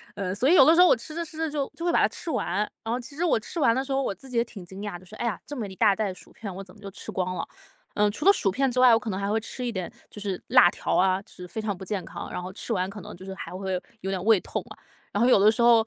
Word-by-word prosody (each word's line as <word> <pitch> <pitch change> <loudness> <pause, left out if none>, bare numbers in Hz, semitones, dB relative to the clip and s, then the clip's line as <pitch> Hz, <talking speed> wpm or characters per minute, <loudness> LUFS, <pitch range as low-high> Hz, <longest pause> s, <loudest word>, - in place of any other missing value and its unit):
呃， 190 -2 -2
所 250 +6 +1
以 - - +6
有 275 - +9
的 320 - +7
时 - - +3
候 360 - +8
我 - - +6
吃 250 +6 -9
着 340 - -1
吃 310 - -11
着 320 0 -1
就 285 -2 -2
就 335 - -7
会 345 - +3
把 - - +3
它 - - +5
吃 - - -8
完。 195 - -1 0.3
然 225 - -2
后 - - 0
其 260 +3 -10
实 340 - 0
我 330 - +3
吃 330 - -6
完 230 - +5
的 260 - 0
时 275 - -7
候， 270 0 +2
我 200 - -2
自 265 +8 -13
己 250 - -3
也 230 - +4
挺 200 -6 -10
惊 190 +3 -9
讶 205 -4 -4
的， 180 - -17
说， 215 +4 -11
哎 - - -3
呀， 220 -6 -1
这 290 - -7
么 220 -4 -3
一 190 - -10
大 210 0 +4
袋 205 -2 -1
薯 - - -16
片 200 -4 -7
我 195 - -6
怎 185 -1 -15
么 - - -18
就 200 - -7
吃 - - -7
光 185 -1 -2
了， - - -4 0.5
呃， 210 0 +3
除 275 - -5
了 395 - +9
薯 205 - +1
片 265 +6 +1
之 250 - -1
外， 250 -2 +8
我 225 - +5
可 230 - -5
能 190 -1 -2
还 200 0 -1
会 220 +2 +2
吃 250 +3 -6
一 240 - -1
点 185 -5 -4 0.2
就 210 - -10
是 195 -3 -3
辣 175 - +7
条 - - -2
啊， 185 0 +3
就 - - -16
是 180 - -9
非 180 - -5
常 210 -2 -2
不 190 - -9
健 190 -1 -3
康， - - -7
然 - - -4
后 185 +1 -7
吃 220 - -6
完 185 -4 +1
可 205 0 -8
能 - - -9
就 185 +2 -12
是 190 - -6
还 190 - -8
会 185 -1 -3 0.2
有 195 - -3
点 185 -2 -2
胃 220 -1 +5
痛 - - -4
啊。 - - -11 0.4
然 205 - 0
后 - - +5
有 250 - +6
的 210 +2 +6
时 235 +2 0
候， 235 -1 +6
210 Hz, 385 characters per minute, -26 LUFS, 190-250 Hz, 0.5 s, 有